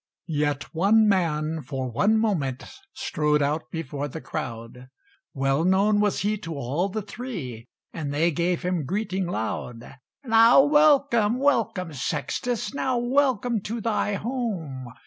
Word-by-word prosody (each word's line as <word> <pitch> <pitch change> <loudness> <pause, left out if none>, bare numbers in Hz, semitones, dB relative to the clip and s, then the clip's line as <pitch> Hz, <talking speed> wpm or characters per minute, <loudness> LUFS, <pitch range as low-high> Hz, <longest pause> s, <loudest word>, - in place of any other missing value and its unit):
Yet 145 -4 -1
one 210 +6 +4
man 160 -5 0
for 130 -2 -4
one 210 - +2
moment 160 - -1 0.3
Strode 150 - 0
out 150 +3 -2
before 145 -3 -4
the 155 +3 -7
crowd; 125 -4 -7 0.5
Well 135 +2 +1
known 200 +3 +3
was 210 -1 +1
he 210 +1 0
to 165 -3 -6
all 145 +8 -1
the 215 +2 -4
Three, 185 - -7 0.3
And 150 -4 -4
they 160 +4 +2
gave 170 +2 -1
him 180 -4 -1
greeting 190 +2 -2
loud. 120 -3 -5 0.3
"Now 230 +1 +6
welcome, 280 -7 +4
welcome, 225 - 0
Sextus! 210 - -2
Now 260 -2 0
welcome 245 -3 +1
to 225 +4 -4
thy 210 -2 0
home! 195 - -4
185 Hz, 135 wpm, -25 LUFS, 145-225 Hz, 0.5 s, Now